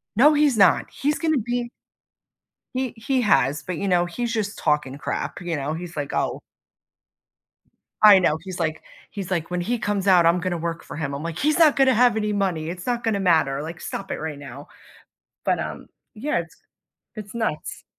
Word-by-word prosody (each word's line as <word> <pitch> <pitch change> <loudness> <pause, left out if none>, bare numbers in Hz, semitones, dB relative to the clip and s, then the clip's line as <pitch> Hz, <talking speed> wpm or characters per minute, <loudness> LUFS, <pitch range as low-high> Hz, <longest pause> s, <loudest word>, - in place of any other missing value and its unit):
"No, 285 +8 +6
he's 290 -5 +3
not. 195 -4 +4
He's 295 +2 -1
gonna 315 -3 +1
be" 240 +1 -2 1.0
He 260 -1 -2
he 255 +3 0
has, 140 - +2
but, 180 -3 -5
you 200 - -2
know, 175 -1 +3
he's 235 +7 -3
just 210 -3 -2
talking 150 -4 0
to 140 - -9
crap, - - -4
you 175 -3 -3
know? 145 +2 -3
He's 170 -1 -7
like, 145 -1 -3
"Oh" - - -1 1.6
I 210 -2 +9
know, 160 -4 +2
he's 185 -2 -7
like 160 -1 -2 0.3
he's 195 -3 -6
like, 170 -2 -2
"When 180 0 -1
he 235 +7 -1
comes 205 -2 -1
out, 180 -3 +6
I'm 170 +2 +4
gonna 175 -1 -2
work 165 0 -4
for - - -9
him." 145 -3 -3
I'm 140 - -5
like, 165 -1 -5
"He's 305 +3 +2
not 315 -4 +6
gonna 265 -2 +4
have 240 -1 +4
any 210 -1 0
money, 185 -6 -1
it's 180 +4 -6
not 240 -1 -1
gonna 220 -3 0
matter. 160 -7 +2
Like, 160 +2 -7
stop - - -6
it - - -3
right 155 -2 -5
now." 140 0 -10 0.8
but, - - +1
um - - -6 0.3
Yeah, 250 0 -1
it's 165 -1 -11 0.6
it's 210 -1 -8
nuts. 220 -9 -3
185 Hz, 200 wpm, -23 LUFS, 160-235 Hz, 1.6 s, I